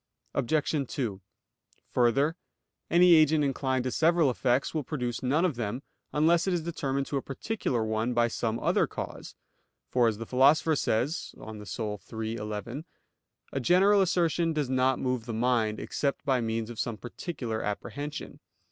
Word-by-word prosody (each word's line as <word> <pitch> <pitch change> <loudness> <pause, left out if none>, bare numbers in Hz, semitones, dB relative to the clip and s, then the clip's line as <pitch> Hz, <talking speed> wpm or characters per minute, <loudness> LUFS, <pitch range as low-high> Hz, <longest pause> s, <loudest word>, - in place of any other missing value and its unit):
Obj. 145 +1 0
2: 105 -8 -3 0.7
Further, 135 +6 +2 0.5
any 175 +1 +6
agent 155 -1 +5
inclined 130 -2 0
to 130 - -2
several 165 -2 +3
effects 125 +2 0
will 155 - 0
produce 125 -4 -3
none 145 +7 +2
of 155 -9 -1
them, 120 +3 -3 0.3
unless 165 +4 +3
it 185 - +2
is 170 - -2
determined 140 -5 -2
to 140 - -2
a - - -1
particular 135 - -2
one 110 +2 -1
by 120 0 +4
some 115 -1 -2
other - - +2
cause; - - -7 0.5
for, 125 -2 +3
as 110 -2 0
the 115 - -6
Philosopher 140 +6 +4
says 135 +5 -1
(De - - -13
Anima 105 -1 -8 0.5
iii, 110 0 -2
11), 110 +7 -5 0.7
a 135 - 0
general 190 +8 +5
assertion 170 -2 +1
does 145 -4 -1
not 130 0 +2
move 125 -2 -2
the 115 - -3
mind, 115 -2 +1
except 140 0 -2
by 130 -3 +2
means 115 0 -2
of 115 - -9
some 115 -3 -2
particular 120 -2 -5
apprehension. 145 +8 -5
130 Hz, 160 wpm, -28 LUFS, 115-155 Hz, 0.7 s, any